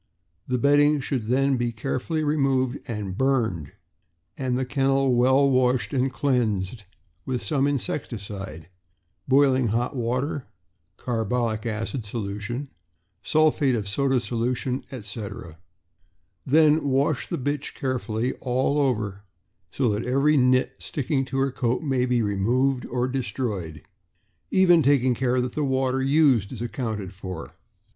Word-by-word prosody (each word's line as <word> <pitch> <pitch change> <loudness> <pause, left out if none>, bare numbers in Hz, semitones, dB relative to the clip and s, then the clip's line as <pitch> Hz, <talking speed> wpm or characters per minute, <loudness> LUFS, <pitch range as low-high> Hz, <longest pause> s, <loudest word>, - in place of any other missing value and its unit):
The 125 - 0
bedding 145 +3 +4
should 130 -4 -3
then 135 +2 +2
be 120 -1 -1
carefully 135 +7 -2
removed 135 -4 +1
and 105 -6 -4
burned, 110 - 0 0.6
and 130 -2 -1
the 130 - -1
kennel 135 0 +2
well 130 +3 +4
washed 130 0 +2
and 130 0 +1
cleansed 115 -6 -1 0.4
with 125 -2 -3
some 140 -2 +1
insecticide 100 - -4 0.3
— 85 - -47
boiling 130 -2 +4
hot 120 +5 -1
water, 125 +3 -2 0.5
carbolic 115 -1 -1
acid 115 +3 -3
solution, 105 +5 -5 0.5
sulphate 150 -3 +2
of 105 -3 -3
soda 130 +5 +1
solution, 120 +3 -2
etc. 100 - -7 0.9
Then 155 0 +4
wash 135 +1 +1
the - - -2
bitch 145 +2 -3
carefully 125 -2 -2
all 130 +3 0
over, 105 -8 -1 0.5
so 135 - 0
that 105 +2 -1
every 140 +4 +2
"nit" 130 -1 +3
sticking 135 -1 -2
to 130 +1 -4
her 135 0 +1
coat 125 +2 -1
may 130 -4 +1
be 120 -2 +2
removed 125 +6 +1
or 125 0 -1
destroyed; 105 - -3 0.7
even 175 -3 +5
taking 135 -3 +3
care 125 +1 0
that 125 0 -3
the 150 - -1
water 130 -1 0
used 135 -7 +3
is 125 - -7
accounted 110 -6 -4
for. 95 -3 -7
125 Hz, 130 wpm, -25 LUFS, 115-135 Hz, 0.9 s, even